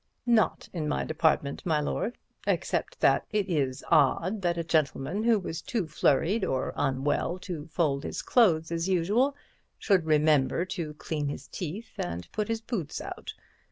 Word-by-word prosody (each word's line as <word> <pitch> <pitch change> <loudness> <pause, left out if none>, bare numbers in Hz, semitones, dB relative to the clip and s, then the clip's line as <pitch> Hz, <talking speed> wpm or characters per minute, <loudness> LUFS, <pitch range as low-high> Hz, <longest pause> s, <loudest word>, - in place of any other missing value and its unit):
"Not 235 -4 +2
in 160 -4 -2
my 150 - 0
department, 155 -3 +1
my 160 -4 +1
lord. 225 +10 -2 0.3
Except - - -1
that - - +4
it 210 -2 0
is 140 -7 -1
odd 170 +6 +3
that 175 -2 0
a 170 - -1
gentleman 160 +4 0
who 230 -1 +4
was 170 -4 -4
too 225 -7 -2
flurried 160 +7 +2
or 130 -7 -1
unwell 145 +5 0
to 165 -6 -6
fold 150 -5 0
his - - -4
clothes 165 -10 +3
as 170 +2 -1
usual 210 +11 +2 0.4
should 190 -6 +2
remember 155 +1 +3
to 160 -5 -5
clean 150 -1 -3
his 145 - -6
teeth 200 +7 -6
and 85 0 -3
put 215 -1 -2
his 225 -1 -2
boots 200 - -4
out. - - -7
165 Hz, 160 wpm, -28 LUFS, 150-200 Hz, 0.4 s, that